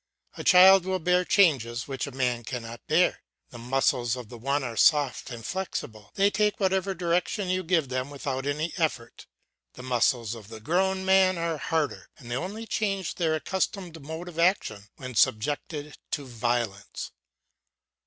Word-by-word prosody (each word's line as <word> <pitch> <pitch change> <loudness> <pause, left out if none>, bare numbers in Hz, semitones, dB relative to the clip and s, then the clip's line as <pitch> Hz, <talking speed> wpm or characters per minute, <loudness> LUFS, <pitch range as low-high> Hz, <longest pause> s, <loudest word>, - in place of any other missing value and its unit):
A - - -6
child 190 +1 +8
will 190 0 0
bear 180 +1 +2
changes 130 - +2
which 135 0 -3
a - - -7
man 125 -2 -1
cannot 120 0 -6
bear, 170 +4 +2 0.3
the 120 - -10
muscles 125 -1 +1
of 125 -4 -9
the 120 - -9
one 140 +4 0
are 120 -3 -4
soft 145 0 +3
and 115 -3 -8
flexible, 110 - -5
they 200 +1 +3
take 210 +1 +1
whatever 190 0 +1
direction 180 +3 -1
you 185 0 +1
give 165 -6 +1
them 130 +1 -2
without 140 -1 -4
any 150 +4 -2
effort; 150 -8 -3 0.5
the 125 - -11
muscles 120 -2 +1
of 110 -4 -10
the 110 0 -9
grown 190 - 0
man 190 -1 +4
are 165 -2 -2
harder 160 -1 -2
and 120 -2 -11
they - - 0
only 200 - -4
change 195 -4 -1
their 160 -3 0
accustomed 180 -1 -3
mode 160 +5 -7
of 170 -2 -8
action 110 - +1
when 130 -2 -8
subjected 145 +7 0
to 145 - -3
violence. 120 -4 -3
145 Hz, 165 wpm, -27 LUFS, 120-185 Hz, 0.5 s, child